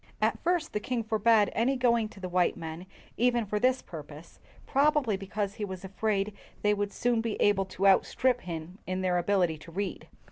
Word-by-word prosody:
At - - +1
first 345 -2 0
the 210 - 0
king 235 +2 -2
forbade 220 -1 +3
any 250 +5 +2
going 235 -3 +2
to 205 - -14
the 185 - -4
white 180 0 +1
men 165 +2 -7 0.3
even 240 -1 +2
for 210 +1 -1
this 255 +3 +2
purpose, 155 0 -11 0.3
probably 280 -5 +2
because 200 +1 -3
he 210 - -6
was 190 -1 -5
afraid 200 +1 -1 0.3
they 210 0 +4
would 205 0 -2
soon 240 -2 +1
be 225 -2 -3
able 195 -2 +3
to 190 +1 -3
outstrip 245 +5 +3
him 170 +2 -7
in 185 0 -2
their 180 -1 +1
ability 175 -4 +1
to 165 - -12
read. 200 +4 -4
205 Hz, 190 wpm, -29 LUFS, 185-230 Hz, 0.3 s, they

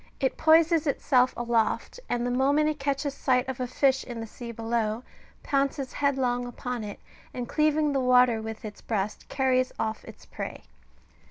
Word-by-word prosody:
It 265 -2 0
poises 325 0 +4
itself 255 -2 +3
aloft, 235 - 0
and 245 0 0
the 245 - 0
moment 280 +4 +3
it 305 -1 -1
catches 280 0 -1
sight 255 -2 +1
of 265 -1 -4
a 250 - -1
fish 265 +1 +2
in 240 -2 -7
the 225 - -4
sea 235 +2 -8
below, 230 0 -2 0.4
pounces 275 -1 -1
headlong 255 -4 0
upon 245 -1 -5
it, 205 -1 -7 0.4
and 245 -1 -4
cleaving 305 0 +2
the 270 - +1
water 250 -3 +4
with 220 0 -7
its 210 -1 -8
breast, 210 -2 -3
carries 255 -1 +1
off 220 0 -2
its - - -13
prey. - - -7
255 Hz, 170 wpm, -27 LUFS, 235-280 Hz, 0.4 s, poises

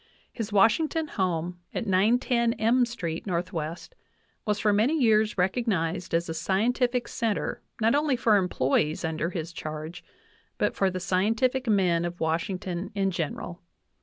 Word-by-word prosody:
His 225 -3 -5
Washington 300 +10 +3
home 175 -2 -2 0.2
at - - -2
910 230 +4 +2
M 235 +3 +3
street 170 -8 -4
N. 185 - -1
W. 170 -2 -3 0.7
was 210 -1 +1
for 210 -1 +2
many 235 +10 +2
years 215 -4 +3
recognized 185 -4 0
as 170 +1 0
a 165 - -3
scientific 240 +9 0
center 210 -9 -2 0.2
not 225 +1 +3
only 290 -1 +2
for 225 -3 +3
employees 155 -4 +1
under 160 +1 -1
his 170 -2 -5
charge, 155 +3 -6 0.5
but - - 0
for 195 - +2
the 185 0 -4
scientific 225 +8 +1
men 185 -5 +3
of 175 0 -4
Washington 175 +3 -2
in 195 -1 +1
general. 175 +1 -4
190 Hz, 145 wpm, -27 LUFS, 170-230 Hz, 0.7 s, Washington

